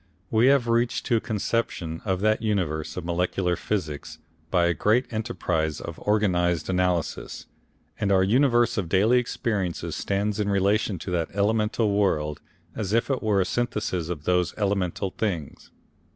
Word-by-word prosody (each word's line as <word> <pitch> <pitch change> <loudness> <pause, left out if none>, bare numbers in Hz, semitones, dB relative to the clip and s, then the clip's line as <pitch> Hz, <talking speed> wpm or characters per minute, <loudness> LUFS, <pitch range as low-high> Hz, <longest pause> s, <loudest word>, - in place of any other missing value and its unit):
We 115 +3 +4
have 135 -3 +4
reached 115 +1 +1
to 115 - +2
a - - +2
conception 105 -7 -2
of 95 -2 0
that 110 +1 +2
universe 90 -9 -1
of 90 - -4
molecular 90 +1 0
physics 80 -5 -4 0.3
by 90 -1 +3
a 85 - +2
great 110 - +2
enterprise 85 -9 -1
of 85 - -7
organised 90 -6 +1
analysis, 90 -3 -1 0.5
and 105 -2 +1
our 95 -1 +4
universe 120 +1 +3
of 90 -5 -3
daily 110 +7 +4
experiences 105 -7 -2
stands 100 +1 -1
in 105 -1 0
relation 100 +1 +1
to 90 +3 -6
that 85 -2 0
elemental 105 +1 +1
world 75 -7 0 0.3
as 105 -1 -3
if 115 +4 +2
it 130 - -1
were 105 -3 +2
a - - +1
synthesis 105 -8 -2
of 80 -4 -4
those 90 +1 +1
elemental 95 -2 -1
things. 90 -10 -3
100 Hz, 155 wpm, -25 LUFS, 90-110 Hz, 0.5 s, We